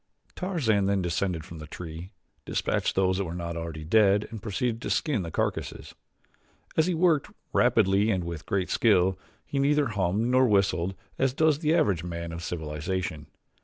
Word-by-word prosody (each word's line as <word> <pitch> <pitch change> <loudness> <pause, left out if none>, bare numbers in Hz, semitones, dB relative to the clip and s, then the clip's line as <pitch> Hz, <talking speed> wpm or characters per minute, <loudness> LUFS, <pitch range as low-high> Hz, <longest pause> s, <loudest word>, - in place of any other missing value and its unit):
Tarzan 125 - +1
then 100 -2 +1
descended 85 -2 -1
from 85 - -10
the 75 - -8
tree, 85 +2 -8 0.3
dispatched - - -1
those 95 0 +2
that - - +1
were 85 0 -5
not 85 -1 -4
already 80 -2 -5
dead 100 +3 +4
and 110 -3 -7
proceeded 115 +3 -2
to - - -4
skin 140 -9 +1
the 85 - -5
carcasses. - - -3 0.8
As 160 +1 +3
he 180 - +1
worked, 165 -4 +2 0.2
rapidly 100 +3 +3
and 95 -5 +1
with 85 -2 -6
great 95 -2 -1
skill, 95 -4 +3 0.3
he 140 - -2
neither 145 -1 +3
hummed 100 -1 0
nor 130 0 +4
whistled 95 -3 +1 0.2
as 135 -1 +2
does 155 -2 +3
the 155 0 +2
average 95 - +2
man 85 -1 -5
of 85 0 -6
civilization. 80 -1 -4
95 Hz, 170 wpm, -27 LUFS, 85-115 Hz, 0.8 s, dead